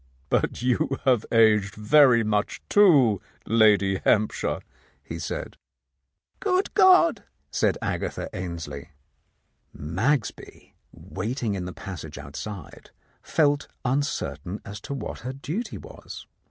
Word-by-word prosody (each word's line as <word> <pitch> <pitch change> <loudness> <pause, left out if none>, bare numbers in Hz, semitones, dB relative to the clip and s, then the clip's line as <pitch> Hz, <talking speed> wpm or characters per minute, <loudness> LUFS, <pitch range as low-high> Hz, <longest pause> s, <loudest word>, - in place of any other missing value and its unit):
"But - - 0
you 130 +2 +1
have 125 -5 +3
aged 105 -4 +4
very 120 +2 +5
much, 105 -1 -1
too, 140 - +5 0.2
Lady 105 -4 +4
Hamp 110 0 +3
shire," - - -3 0.4
he - - -7
said. - - -5 0.8
"Good 380 -1 0
God 365 - +6
I" - - -29 0.2
said - - +1
Agatha - - -3
Ainslie. 85 -3 -6 0.9
Magsby, 105 - -2 0.2
waiting 110 +3 -4
in 95 -2 -4
the 90 - -5
passage 80 -6 -8
outside, 75 +9 -8 0.3
felt 145 -3 +1 0.2
un 130 +3 +2
certain 90 - -4
as 100 +1 -8
to 140 - -5
what 115 -6 -6
her 130 +2 -5
duty 155 - -5
was. - - -11
110 Hz, 120 wpm, -25 LUFS, 100-140 Hz, 0.9 s, God